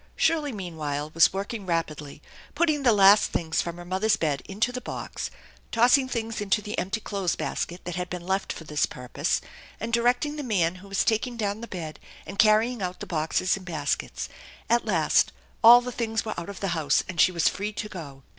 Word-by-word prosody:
Shirley 305 -3 +1
meanwhile 155 - -4
was 165 0 +6
working 200 +1 -5
rapidly, 150 -4 -3 0.3
putting 310 -2 +2
the 250 -3 +5
last 200 0 +6
things 160 -1 0
from 170 0 -5
her 175 - -9
mother's 190 +5 +2
bed 150 -4 -1
into 215 +5 0
the 250 0 -5
box, - - -5 0.4
tossing 250 +3 +4
things 225 -3 -3
into 205 +1 +2
the 210 0 -5
empty 195 +5 -2
clothes 200 -5 -2
basket 175 +2 -3
that 175 0 -4
had 180 0 -3
been 180 -1 -6
left 190 +1 -1
for - - -7
this 150 -1 0
purpose, 125 -1 -2 0.4
and 230 +2 -4
directing 245 +5 +2
the 295 - -4
man 185 -8 +1
who 200 - -13
was 195 -1 0
taking 235 +2 0
down 210 0 -2
the 235 - -6
bed 160 -6 -6 0.3
and 195 +1 -9
car 215 0 +6
rying 240 -1 -3
out 180 -1 -3
the - - -6
boxes 165 +3 0
and 190 -2 -10
baskets. 150 -4 -2 0.4
At 235 0 +3
last - - +2 0.3
all 240 +2 +10
the 250 0 -5
things 225 -2 -2
were 215 - -2
out 170 +3 -6
of 200 - -8
the 195 - -1
house, 160 -4 +1
and 180 -3 0
she 185 - +5
was 170 -2 +2
free 205 +2 -1
to 210 - -4
go. 145 -9 -9
195 Hz, 210 wpm, -26 LUFS, 170-225 Hz, 0.4 s, all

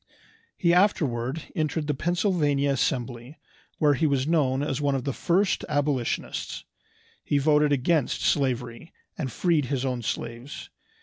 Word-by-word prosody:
He 170 -1 +3
afterward 155 - +1
entered 155 0 -1
the 150 - 0
Pennsylvania 155 -4 +1
Assembly, 125 0 -2 0.4
where 150 -2 +4
he 150 +4 +1
was 135 -2 +1
known 140 -4 +1
as 140 -1 -2
one 140 -1 +1
of 130 - -2
the 140 - -2
first 185 +8 +1
abolitionists. 145 -4 -2 0.6
He 145 - +1
voted 150 +1 +3
against 145 +1 +1
slavery, 125 +1 -1 0.2
and 135 -5 -4
freed 165 -2 +1
his 135 0 -2
own 125 -2 -2
slaves. 120 +4 -5
145 Hz, 135 wpm, -26 LUFS, 130-155 Hz, 0.6 s, where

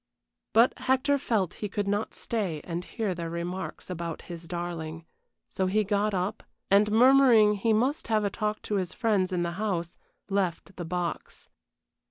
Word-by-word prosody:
But 230 +3 +6
Hector 265 +2 +2
felt 215 - 0
he 210 - -2
could 205 +1 -2
not 205 +2 -1
stay 195 -9 -2
and 170 0 -4
hear 215 -1 -2
their 170 -1 -5
remarks 175 +3 -5
about 170 -2 -5
his 170 -1 -9
darling, 165 -2 -5 0.4
so 190 - -1
he 210 +3 +2
got 205 0 0
up, 190 +4 -2 0.3
and, 205 +1 +5
murmuring 240 -2 +6
he 210 +2 0
must 255 +7 +1
have 215 -2 +2
a 200 - 0
talk 215 +1 -2
to 210 - -1
his 185 -1 -2
friends 205 -6 +1
in 175 -1 0
the 170 - -1
house, 175 -5 -2 0.3
left 195 -1 -1
the 175 - -4
box. 175 0 -4
200 Hz, 170 wpm, -28 LUFS, 175-215 Hz, 0.4 s, But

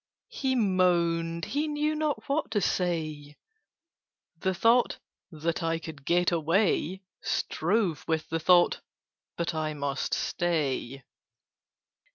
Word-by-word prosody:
'" - - -65
He 265 -1 +2
moaned: 170 -5 +2
he 295 +3 -1
knew 300 +1 0
not 305 -1 -2
what 285 +2 0
to 220 -2 +1
say. 155 -6 -2 1.0
The 190 0 0
thought 230 +6 +3 0.3
"That 165 0 -2
I 165 0 0
could 155 -4 -9
get 175 +1 +3
away!" 175 +2 +1 0.2
Strove 180 -2 0
with 160 -1 -1
the 165 - -2
thought 175 +2 +4 0.6
"But 170 0 -1
I 155 -1 -2
must 140 -1 -2
stay. 140 -6 -1
170 Hz, 120 wpm, -28 LUFS, 160-200 Hz, 1.0 s, thought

